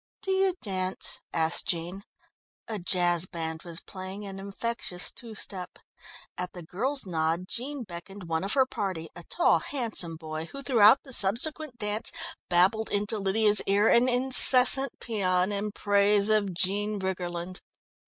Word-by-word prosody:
"Do 385 - -2
you 380 -1 +1
dance?" 185 -3 -4
asked 160 0 +1
Jean. 175 +3 -3 0.7
A 220 -2 -5
jazz 175 -1 +1
band 160 -2 -5
was 170 -1 -1
playing 190 +2 -8
an 195 -1 -7
infectious 200 -1 -3
two 230 -2 -11
step. 185 -3 -5 0.6
At 180 0 -5
the 175 - -9
girl's 250 - -4
nod 165 0 -2
Jean 265 +4 -5
beckoned 190 +1 -10
one 165 -1 -3
of 195 - 0
her 265 -2 +3
party, 195 -11 -5
a 175 - -9
tall, 340 - +1
handsome 225 - 0
boy 155 0 -7
who 275 +10 -9
throughout 230 -2 +5
the 265 - -9
subsequent 250 +7 +1
dance 210 0 -4 0.4
babbled 190 +5 +2
into 205 +1 0
Lydia's 205 +1 +4
ear 205 +2 +3
an 245 +2 +4
incessant 255 +1 +6
pæan 185 -4 -1
in 205 +1 -3
praise 205 0 +2
of 210 -3 +1
Jean 205 +4 0
Briggerland. 180 -1 -5
200 Hz, 150 wpm, -27 LUFS, 180-230 Hz, 0.7 s, incessant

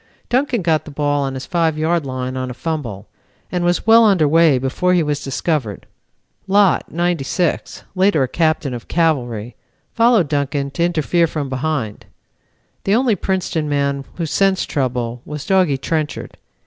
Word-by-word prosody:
Duncan 250 -4 +1
got 160 -2 +1
the - - -9
ball 145 0 0
on 135 -1 -2
his 130 - -6
5 165 -4 0
yard 160 -1 0
line 130 0 -4
on 130 0 -3
a 125 - -7
fumble, 125 - -4 0.4
and 180 -1 -1
was 175 0 +1
well 225 +1 +7
under 190 -8 +4
way 160 -2 +4
before 135 +8 0
he 175 - +3
was 145 -1 -2
discovered. 135 - -2 0.6
Lott, 195 -2 +3
'96, 175 0 -1
later 185 -6 +3
a - - 0
captain 155 -3 0
of 120 -2 -7
Cavalry, 125 -9 -1 0.4
followed 230 -7 +4
Duncan 140 -1 -1
to 170 - -1
interfere 170 0 +1
from 150 -3 -4
behind. 130 -5 -3 0.8
The 195 - +2
only 240 -2 +2
Princeton 175 -5 -2
man 140 -1 0
who 170 - -2
sensed 195 +4 +1
trouble 125 -3 -2
was 150 0 -7
Doggy 185 -7 +2
Trenchard. 155 +2 -3
155 Hz, 160 wpm, -19 LUFS, 135-175 Hz, 0.8 s, well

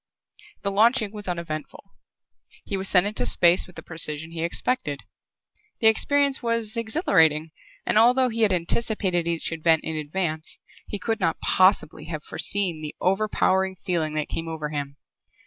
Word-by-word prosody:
The 200 - -1
launching 220 +1 +3
was 210 -2 -8
uneventful. 170 +1 -6 0.7
He 200 - -3
was 195 0 -4
sent 180 0 +4
into 210 +1 -2
space 175 +2 +4
with 180 - -16
the - - -9
precision 160 -1 -2
he 165 -1 -5
expected. 170 - -1 0.8
The - - -1
experience 280 +5 +3
was 230 -1 -1
exhilarating 175 - +2 0.3
and, 215 - +3
although 250 +3 +4
he 230 0 -3
had 215 -3 +4
anticipated 185 -1 0
each 170 -1 -2
event 165 0 +2
in 160 - -4
advance, 155 +1 -3 0.3
he 205 - -4
could 225 +2 -2
not 165 -4 0
possibly 170 -5 +2
have 155 -2 -6
foreseen 185 -6 -2
the 150 -1 -6
overpowering 190 -1 +1
feeling 170 -4 -2
that 155 -1 -1
came 165 - -4
over 160 -2 -4
him. 140 -1 -5
180 Hz, 155 wpm, -24 LUFS, 160-215 Hz, 0.8 s, sent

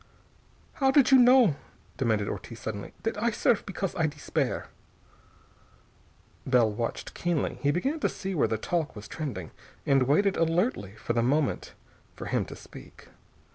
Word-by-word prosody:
"How 270 - +5
did 275 0 +5
you 265 - +8
know," 245 - +6 0.4
demanded 110 -6 +1
Ortiz 115 +1 -6
suddenly, 100 -2 -5
"that 225 -2 -2
I 235 - +3
serve 220 0 +1
because 195 -1 -3
I 160 -3 +2
despair?" 150 -1 -2 1.8
Bell 125 -4 +3
watched 115 +3 -4
keenly. 170 -4 -1
He 140 - +2
began 265 - 0
to - - +1
see 195 0 -5
where 160 - +2
the 110 - -1
talk 160 +6 -2
was 105 0 -9
trending, 120 - -5 0.3
and 135 -2 +3
waited 195 +8 +3
alertly 165 - 0
for 110 +1 -3
the 115 - +2
moment 140 +4 0 0.4
for - - -7
him - - 0
to - - -9
speak. - - -14
155 Hz, 155 wpm, -28 LUFS, -, 1.8 s, you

